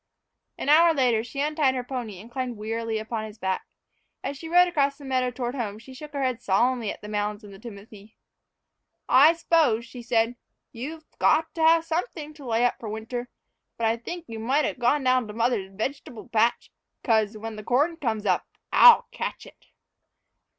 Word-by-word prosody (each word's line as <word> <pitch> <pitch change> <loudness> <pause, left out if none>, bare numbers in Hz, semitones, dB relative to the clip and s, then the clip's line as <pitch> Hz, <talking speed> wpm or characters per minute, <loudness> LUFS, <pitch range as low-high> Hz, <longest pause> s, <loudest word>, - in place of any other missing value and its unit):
An - - -5
hour 325 +3 +6
later, 245 -5 +2
she 245 +4 -5
untied 295 -3 +1
her 250 - -2
pony 240 -7 -6
and 225 +5 -13
climbed 250 -2 -4
wearily 225 +1 -3
upon 220 0 -4
his 215 0 -10
back. 190 -2 -2 0.6
As 280 - -3
she 325 +4 -9
rode 355 +1 +6
across 280 -5 +1
the 285 - -12
meadow 255 -1 0
toward 245 0 -4
home, 220 -6 -4
she 235 +4 -13
shook 295 +3 -10
her 280 -1 -2
head 255 -2 -1
solemnly 235 +3 +1
at - - -10
the - - -7
mounds 210 0 -3
in 205 - -11
the 195 - -12
timothy. 210 -1 -12 0.9
"I 295 +5 +7
s'pose," 315 -9 +2
she 250 -1 -10
said, 230 0 +1 0.3
"you've 305 +7 -7
got 320 +1 +3
to 330 - -4
have 325 +1 +5
something 320 -2 -3
to 295 -3 -13
lay 230 +1 +2
up 245 - +1
for 225 - -6
winter; 230 +3 -5 0.5
but 230 - -1
I 225 +1 +2
think 345 +9 -7
you 225 -1 -7
might 270 +7 +1
'a' - - -1
gone 255 +3 +1
down 255 -2 +2
to 210 - -8
mother's 230 -4 0
veg'table 225 +2 -5
patch, 230 +1 +1 0.3
'cause, 220 -2 +1
when 225 +1 -6
the 215 - -8
corn 285 +9 +1
comes 225 -9 -2
up, 185 -3 +1 0.3
I'll 480 -2 +8
catch - - -5
it!" - - -18
245 Hz, 195 wpm, -25 LUFS, 220-285 Hz, 0.9 s, I'll